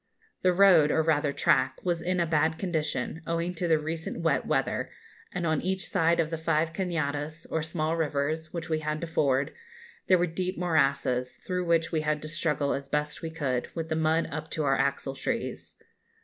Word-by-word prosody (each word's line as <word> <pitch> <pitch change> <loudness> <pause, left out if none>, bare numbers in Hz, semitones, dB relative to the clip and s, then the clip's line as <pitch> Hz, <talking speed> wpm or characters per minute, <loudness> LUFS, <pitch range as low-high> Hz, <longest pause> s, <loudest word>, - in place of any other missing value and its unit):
The 185 - +4
road, 180 -5 +6
or 160 - +2
rather 150 -2 +2
track, 130 -1 +2
was 170 -2 0
in 180 +1 0
a 170 - +3
bad 160 0 +1
condition, 160 -5 -2
owing 170 +1 -1
to 175 0 -2
the 160 -1 +4
recent 160 +2 -4
wet 155 -5 +1
weather, - - 0 0.4
and 180 -1 -3
on 160 -2 +1
each 190 +1 -1
side 170 -2 +2
of 160 -1 +1
the 165 - -3
five 160 0 +1
cañadas, 155 -3 -2
or 160 - 0
small 160 0 -1
rivers, 155 0 -1
which 170 -1 -5
we 160 -2 0
had 155 0 -2
to - - -2
ford, 140 -4 +1 0.5
there 185 - +6
were 175 - +2
deep 180 +2 -3
morasses, 140 -7 +1
through 180 -1 -1
which 165 -1 +2
we 160 -2 +1
had 150 0 0
to - - -4
struggle 150 -2 0
as 140 0 -5
best 150 0 -1
we 165 - -4
could, 140 -6 -2
with 165 -1 -3
the 160 - 0
mud 160 +1 +2
up 155 +1 -5
to 155 - -2
our 135 -1 +3
axletrees. 140 - -2
160 Hz, 195 wpm, -28 LUFS, 150-170 Hz, 0.5 s, road